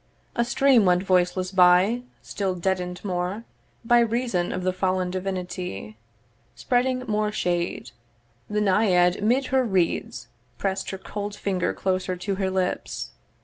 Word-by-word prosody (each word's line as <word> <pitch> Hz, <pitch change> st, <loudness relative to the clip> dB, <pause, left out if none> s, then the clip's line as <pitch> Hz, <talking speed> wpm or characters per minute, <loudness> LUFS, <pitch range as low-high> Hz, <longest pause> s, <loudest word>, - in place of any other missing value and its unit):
A 235 Hz, -, +2 dB
stream 260 Hz, -1 st, +4 dB
went 180 Hz, 0 st, +3 dB
voiceless 185 Hz, 0 st, +1 dB
by, 185 Hz, +5 st, +5 dB, 0.2 s
still 195 Hz, -2 st, -2 dB
deaden'd 180 Hz, +1 st, -2 dB
more 185 Hz, +3 st, -2 dB, 0.4 s
By 240 Hz, +1 st, +5 dB
reason 230 Hz, -6 st, 0 dB
of 185 Hz, -, -3 dB
the 185 Hz, 0 st, 0 dB
fallen 185 Hz, -1 st, 0 dB
divinity 180 Hz, -, -4 dB, 0.6 s
Spreading 255 Hz, 0 st, 0 dB
more 210 Hz, -1 st, 0 dB
shade; 175 Hz, -, -2 dB, 0.6 s
the 210 Hz, 0 st, 0 dB
Naiad 185 Hz, -3 st, +3 dB
'mid 245 Hz, +6 st, +2 dB
her 260 Hz, -1 st, +4 dB
reeds 185 Hz, -, -1 dB, 0.3 s
Press'd 195 Hz, -1 st, -2 dB
her 190 Hz, -, -4 dB
cold 205 Hz, +1 st, -6 dB
finger 190 Hz, -3 st, -1 dB
closer 185 Hz, -1 st, -1 dB
to 195 Hz, +2 st, -2 dB
her 190 Hz, -, +1 dB
lips. 185 Hz, -1 st, -2 dB
190 Hz, 135 wpm, -25 LUFS, 180-210 Hz, 0.6 s, by